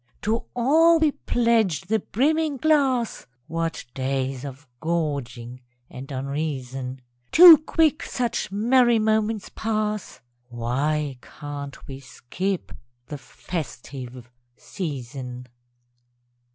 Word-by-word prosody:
_) - - -42
To 225 +3 -1
all 320 +7 +5
we 315 -2 +3
pledge 230 - +1
the 215 +4 0
brimming 300 +7 0
glass! 270 -5 +1 0.2
(What 165 +1 -3
days 135 0 -2
of 140 +1 -9
gorging 135 -7 -3 0.3
and 135 +3 -9
unreason!) 135 -2 -4 0.3
Too 340 -2 +10
quick 310 -1 +1
such 240 -6 -2
merry 240 +3 +4
moments 215 -1 0
pass 215 -2 -2 0.3
(_Why 135 +3 -2
can't 145 -1 -8
we 135 -1 -8
skip 165 +9 -4 0.3
the 145 0 -7
"festive 130 -6 -7 0.3
season"? 125 - -6
160 Hz, 100 wpm, -24 LUFS, -, 0.3 s, Too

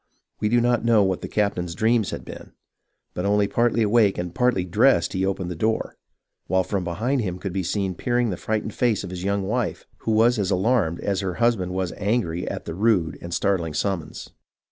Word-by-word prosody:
We 105 - 0
do 120 +2 +4
not 120 -1 +2
know 115 -3 +4
what 95 -2 0
the - - -5
captain's 90 -5 -1
dreams 110 -2 +2
had - - -6
been, - - -10 0.6
but 90 - -3
only 100 0 +2
partly 115 +2 +2
awake 105 -2 +3
and 90 -1 -4
partly 125 -6 +1
dressed 90 -2 +3
he 95 - -1
opened 95 -2 -2
the - - -4
door, 110 +7 -1 0.5
while 95 +1 +2
from 95 +1 -2
behind 115 +11 -1
him 90 -4 -3
could 95 -1 -5
be 95 - -1
seen 95 +1 -1
peering 120 +4 0
the - - -2
frightened 110 +3 -3
face 120 -5 +1
of - - -7
his 90 -1 -6
young 100 0 0
wife, 110 +3 -2
who 110 - -1
was 115 +2 +4
as 95 -2 0
alarmed 95 -3 +1
as 100 -2 -1
her 95 -3 -3
husband 115 -7 +1
was 95 -1 -2
angry 100 -5 -1
at - - -6
the - - -5
rude 95 -6 +1
and 85 - -7
startling 85 -2 0
summons. 85 -1 -3
100 Hz, 210 wpm, -24 LUFS, 90-115 Hz, 0.6 s, do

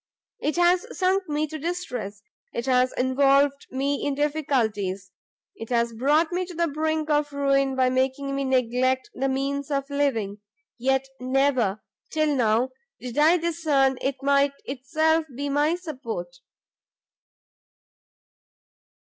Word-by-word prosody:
It 300 - -1
has 350 +1 +3
sunk 375 -2 +1
me 300 +1 0
to 310 +1 -7
distress, 250 - -4 0.3
it 235 - -3
has 255 -1 +3
involved 275 +2 +2
me 275 +2 -1
in 285 -1 0
difficulties; 225 -11 -1 0.4
it 225 - -8
has 235 -1 +1
brought 295 +8 +2
me 360 +1 0
to 360 - -9
the 340 0 +1
brink 315 +1 -1
of 295 0 +1
ruin 275 -1 +1
by 255 -1 +2
making 265 +2 0
me 275 - -1
neglect 255 0 +1
the 270 +1 -1
means 275 +1 -2
of 275 -1 -1
living, 230 -8 0 0.4
yet 265 +2 +1
never, 255 -6 +1 0.3
till 310 -2 +1
now, 240 +1 +2 0.3
did 250 -1 -7
I 320 +4 +6
discern 305 -6 +1
it 270 0 -1
might 280 0 +3
itself 315 +5 0
be 285 +2 -3
my 295 +4 +2
support." 250 - -6
275 Hz, 130 wpm, -25 LUFS, 255-300 Hz, 0.4 s, I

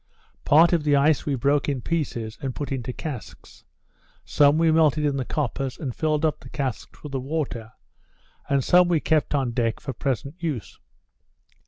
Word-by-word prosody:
Part 165 +4 +6
of 165 -3 +2
the 145 -1 +3
ice 145 +2 +2
we 140 - +1
broke 140 +3 +1
in 140 -2 -1
pieces, 120 -8 -3
and 135 -2 -4
put 145 - -5
into 130 -2 -3
casks; 135 -2 -8 0.6
some 145 +1 +4
we 165 0 +3
melted 155 -2 +3
in 145 -1 +1
the 130 - -1
coppers, 135 -2 -3
and 130 -6 -5
filled 155 0 0
up 155 - 0
the - - -13
casks 135 -5 -5
with 150 - -7
the 135 - -2
water; 130 -5 -4 0.8
and 140 -1 +2
some 180 +5 +5
we 170 -2 +2
kept 155 -1 +1
on 135 -4 0
deck 115 -1 -1
for 135 - -5
present 135 - -3
use. 150 - -4
140 Hz, 180 wpm, -24 LUFS, 130-155 Hz, 0.8 s, Part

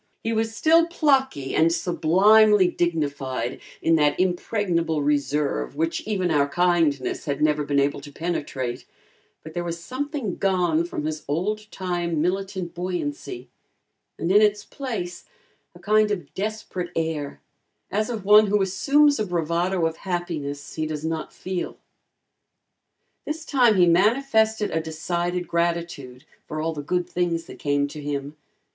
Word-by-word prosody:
He 225 - -1
was 225 0 -1
still 330 +6 +4
plucky 265 - +1
and 165 +1 +4
sublimely 190 +4 +4
dignified 145 -8 -2 0.2
in 165 0 +4
that 150 -1 +2
impregnable 175 -4 0
reserve 145 - 0
which 165 +1 -1
even 185 -5 0
our 145 -2 +2
kindness 165 -5 +1
had 140 -2 -2
never 150 -1 +2
been 145 -1 +1
able 140 0 0
to 145 0 -11
penetrate, 140 -6 -3 0.6
but 160 - -10
there 175 - -2
was 170 -1 -4
something 255 - -4
gone 175 -4 +1
from 150 -3 -4
his 155 0 -3
old 210 +8 -2
time 175 -3 -2
militant 185 +1 -2
buoyancy, 145 -8 -4 0.7
and 170 - -1
in 205 +2 +6
its 210 -1 +2
place 210 -11 -5 0.5
a - - -13
kind 215 +3 +3
of 180 -8 -4
desperate 200 -3 -4
air, 160 -3 -2 0.5
as 215 +3 0
of 220 -5 -4
one 210 +1 +7
who 205 +1 +2
assumes 285 +9 +3
a 215 - 0
bravado 170 +1 0
of 165 0 -2
happiness 165 -6 -4
he 155 -1 -2
does 155 0 -4
not 160 -1 -3
feel. 185 -1 -5 1.5
This 310 +1 -4
time 245 -6 +4
he 180 -2 +5
manifested 220 +3 +3
a 160 - 0
decided 175 +2 -2
gratitude 170 -6 -2 0.2
for 155 - -4
all 165 +1 -1
the 150 - -5
good 180 +4 -1
things 170 -2 -1
that - - -12
came 145 0 +1
to 150 - -8
him. 145 0 -4
175 Hz, 145 wpm, -24 LUFS, 155-205 Hz, 1.5 s, one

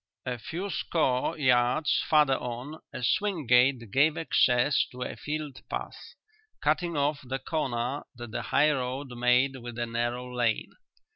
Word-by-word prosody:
A 125 -2 -3
few 185 - -5
score 155 -1 0
yards 130 +2 +3
farther 150 -3 +5
on 125 +6 -6
a - - -6
swing 180 - 0
gate 125 -2 +3
gave 150 +7 +3
access 130 -3 +3
to 125 0 -5
a - - -5
field 150 -3 -5
path, - - -6 0.4
cutting 155 +2 0
off 145 +1 +1
the 130 +1 -3
corner 130 -2 -2
that 120 -1 -8
the - - -3
high 150 +2 +3
road 130 0 -3
made 125 +2 +2
with 120 -1 -8
the 120 0 -2
narrow 120 +2 -3
lane. 120 -3 0
130 Hz, 150 wpm, -28 LUFS, 125-150 Hz, 0.4 s, farther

